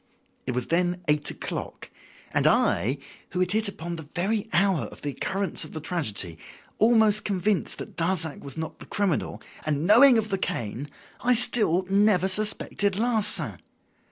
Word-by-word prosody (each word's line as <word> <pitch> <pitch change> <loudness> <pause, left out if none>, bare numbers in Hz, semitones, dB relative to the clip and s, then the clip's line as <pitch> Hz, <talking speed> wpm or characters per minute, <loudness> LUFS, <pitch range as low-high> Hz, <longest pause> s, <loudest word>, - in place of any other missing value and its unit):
It 130 - -1
was 125 -1 -2
then 180 +1 0
eight 150 0 +1
o'clock. - - -6 0.4
And - - +2
I, 130 +7 +2 0.4
who 180 - -2
had 185 0 +2
hit 220 +1 +3
upon 170 -3 -6
the - - -6
very 210 +4 -1
hour 190 -3 +2
of - - -10
the 145 - -2
occurrence 195 +7 -2
of 155 - -9
the 155 - -5
tragedy, 110 - -3 0.4
almost 220 -2 +4
convinced 200 0 -1
that - - -9
Darzac 165 -2 0
was 140 0 -7
not 160 0 -6
the - - -11
criminal, 200 -6 -2 0.2
and 155 0 -1
knowing 240 +6 +7
of 220 -1 -1
the 195 -2 -1
cane, 120 - -4 0.3
I 250 0 +4
still 210 -6 +4
never 195 -1 +3
suspected 205 0 0
Larsan. 205 - +1
185 Hz, 160 wpm, -25 LUFS, 155-210 Hz, 0.4 s, knowing